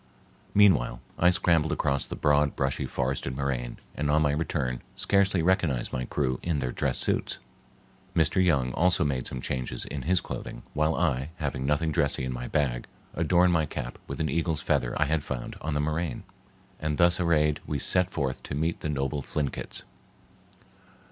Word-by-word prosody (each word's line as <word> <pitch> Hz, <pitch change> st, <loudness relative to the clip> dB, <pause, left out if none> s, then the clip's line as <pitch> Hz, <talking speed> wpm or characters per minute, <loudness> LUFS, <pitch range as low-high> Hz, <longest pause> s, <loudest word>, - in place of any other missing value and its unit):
Meanwhile, 75 Hz, -13 st, +5 dB, 0.2 s
I 90 Hz, -, +6 dB
scrambled 85 Hz, -3 st, +2 dB
across 70 Hz, -2 st, 0 dB
the -, -, -5 dB
broad, 75 Hz, 0 st, +2 dB
brushy, 65 Hz, -1 st, -1 dB
forested 65 Hz, 0 st, -2 dB
moraine, 65 Hz, -3 st, -2 dB, 0.2 s
and 75 Hz, 0 st, -2 dB
on 75 Hz, +1 st, +4 dB
my 75 Hz, -, +3 dB
return 70 Hz, -5 st, -1 dB
scarcely 100 Hz, -3 st, +2 dB
recognized 85 Hz, -9 st, +1 dB
my 65 Hz, -1 st, -1 dB
crew 65 Hz, -3 st, -1 dB
in 85 Hz, -3 st, -1 dB
their 65 Hz, -3 st, -1 dB
dress -, -, 0 dB
suits. -, -, 0 dB, 0.8 s
Mr. 85 Hz, +4 st, +3 dB
Young 70 Hz, -8 st, +2 dB
also 85 Hz, 0 st, +3 dB
made 65 Hz, -4 st, -1 dB
some 65 Hz, -, -4 dB
changes 60 Hz, -1 st, -3 dB
in 75 Hz, -, -5 dB
his 90 Hz, +7 st, +2 dB
clothing, -, -, -7 dB
while 75 Hz, +1 st, +2 dB
I, 70 Hz, -5 st, 0 dB
having 70 Hz, -5 st, -3 dB
nothing 80 Hz, +2 st, +1 dB
dressy 75 Hz, -4 st, +1 dB
in 65 Hz, -1 st, -2 dB
my 60 Hz, 0 st, -5 dB
bag, 65 Hz, -5 st, 0 dB, 0.3 s
adorned 90 Hz, +2 st, +3 dB
my 80 Hz, -2 st, +2 dB
cap 60 Hz, -2 st, -5 dB
with -, -, -5 dB
an 80 Hz, -, +1 dB
eagle's 80 Hz, +1 st, 0 dB
feather -, -, 0 dB
I 80 Hz, +1 st, +3 dB
found 65 Hz, -4 st, -5 dB
on 75 Hz, 0 st, -2 dB
the -, -, +1 dB
moraine, 75 Hz, -1 st, -1 dB, 0.6 s
and 75 Hz, -1 st, -1 dB
thus 85 Hz, +1 st, +5 dB
arrayed 75 Hz, -4 st, +2 dB
we 75 Hz, -, -1 dB
set 90 Hz, +6 st, +2 dB
forth 70 Hz, -8 st, -2 dB
to -, -, -5 dB
meet 80 Hz, +3 st, -1 dB
the 75 Hz, -, -3 dB
noble 70 Hz, 0 st, -1 dB
Thlinkits. 70 Hz, +1 st, -3 dB
75 Hz, 175 wpm, -28 LUFS, 65-80 Hz, 0.8 s, I